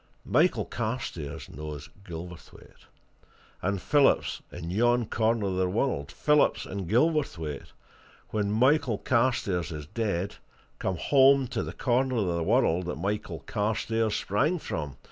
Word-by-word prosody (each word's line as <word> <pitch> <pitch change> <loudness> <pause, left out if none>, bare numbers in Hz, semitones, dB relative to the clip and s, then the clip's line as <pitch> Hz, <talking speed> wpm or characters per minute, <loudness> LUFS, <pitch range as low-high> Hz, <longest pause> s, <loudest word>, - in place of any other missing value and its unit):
Michael - - +2
Carstairs 110 - -4
knows 75 -1 -8
Gilverthwaite 85 -1 -11 0.7
and 100 +1 -1
Phillips 145 +7 +2
in 85 -1 -6
yon 120 +4 +3
corner 110 0 +1
of 95 -1 -1
the 95 -1 +1
world 95 - -1
Phillips 150 -1 +2
and 95 -3 -5
Gilverthwaite, 115 - 0 0.6
when 105 -2 0
Michael 125 +1 +3
Carstairs 115 -9 +1
is 75 -2 -6
dead, 100 0 -2 0.4
come 95 -2 -1
home 135 - +5
to 120 -3 -2
the - - -4
corner 130 0 +1
of 110 -4 +1
the 85 - -1
world 85 +2 +2
that 90 - -2
Michael 100 0 -3
Carstairs 110 +1 0
sprang 145 - +1
from. 75 - -5
105 Hz, 130 wpm, -28 LUFS, 85-125 Hz, 0.7 s, home